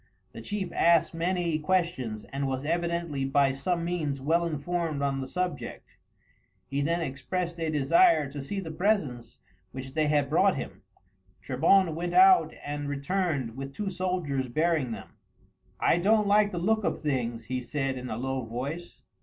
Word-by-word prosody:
The - - -9
chief 205 -3 -4
asked 170 -1 +4
many 170 -1 0
questions, 150 -10 -1
and 140 0 -3
was 135 +1 -3
evidently 170 -3 -1
by 135 0 +3
some 170 +6 -1
means 155 -6 -2
well 165 +5 +1
informed 160 -1 -2
on 135 -1 0
the 130 - -5
subject. 180 +4 -4 0.7
He 140 +1 -2
then 170 +4 0
expressed 170 +4 -3
a 165 -1 -1
desire 155 - +4
to 145 - -6
see 195 +9 -4
the 165 -4 -5
presents 155 - -1 0.3
which 130 0 -8
they 155 0 +1
had 145 -2 +2
brought 185 +6 +3
him. 135 - -6 0.6
Trebon 165 +6 +3
went 175 +2 -3
out 375 0 +7
and 145 0 -3
returned 145 -4 -1
with 135 0 -7
two 205 -2 -3
soldiers 175 -9 -2
bearing 155 0 +1
them. - - -7 0.7
"I - - +3
don't 210 +3 +3
like 205 +1 +4
the 180 - -4
look 215 +5 +1
of - - -1
things," 120 -6 -2
he 130 +2 -2
said 135 +1 -2
in 125 0 -6
a 110 - -3
low 130 +1 -2
voice. 135 +10 -6
155 Hz, 165 wpm, -28 LUFS, 135-175 Hz, 0.7 s, out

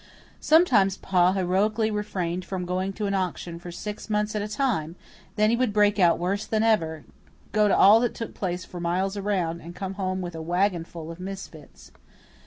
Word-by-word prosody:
Sometimes 235 - +4
Pa 180 -1 +2
heroically 205 +4 +1
refrained 185 -4 -3
from 185 0 -4
going 185 +2 -2
to 210 - -3
an 200 - -1
auction 180 -2 -3
for 175 0 -9
six 210 +5 -7
months 210 0 0
at 210 - 0
a 205 - -3
time; 210 - -1 0.4
then 215 0 +3
he - - +3
would 250 -2 +1
break 205 0 +3
out 175 -2 +5
worse 195 +4 -1
than 220 0 +1
ever, 165 -9 +1 0.5
go 210 0 +3
to 200 - +3
all 210 +3 +7
that 240 0 -1
took 230 - -6
place 180 -2 -3
for 180 - -9
miles 185 +3 -1
around, 190 -5 -1
and 170 +2 -10
come 190 +1 -4
home 190 -1 -2
with 175 -2 -5
a 160 - -6
wagonful 170 -2 -1
of 165 - -10
misfits. 185 -6 -9
190 Hz, 190 wpm, -25 LUFS, 175-210 Hz, 0.5 s, all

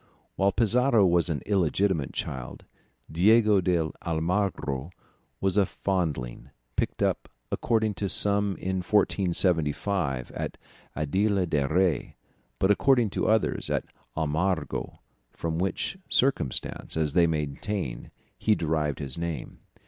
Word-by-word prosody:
While 100 +1 +2
Pizarro 115 0 +3
was 85 -1 +3
an 75 -5 -2
illegitimate 95 -4 +1
child, 65 -2 -5 0.5
Diego 105 +4 +5
de 85 -3 +1
Almagro 80 -4 -1 0.5
was 95 0 0
a 100 - +5
foundling, 75 -10 -2 0.3
picked - - -1
up - - 0 0.2
according 110 -2 +1
to 100 - 0
some 100 0 +2
in 95 0 -2
1475 90 - +1
at - - -5 0.4
Aldea 95 +6 +1
del 75 -5 0
Rey, 90 +2 +1 0.4
but 95 - +3
according 120 0 +3
to - - -1
others 110 0 +1
at - - 0 0.3
Almagro, 80 0 -1 0.3
from 80 0 -3
which 95 - -2
circumstance, 125 - 0
as 75 -3 0
they 85 -1 +5
maintain, 75 - -3 0.3
he 110 - +3
derived 75 -4 -1
his 70 +1 -5
name. 85 -2 -5
90 Hz, 120 wpm, -27 LUFS, 75-100 Hz, 0.5 s, Diego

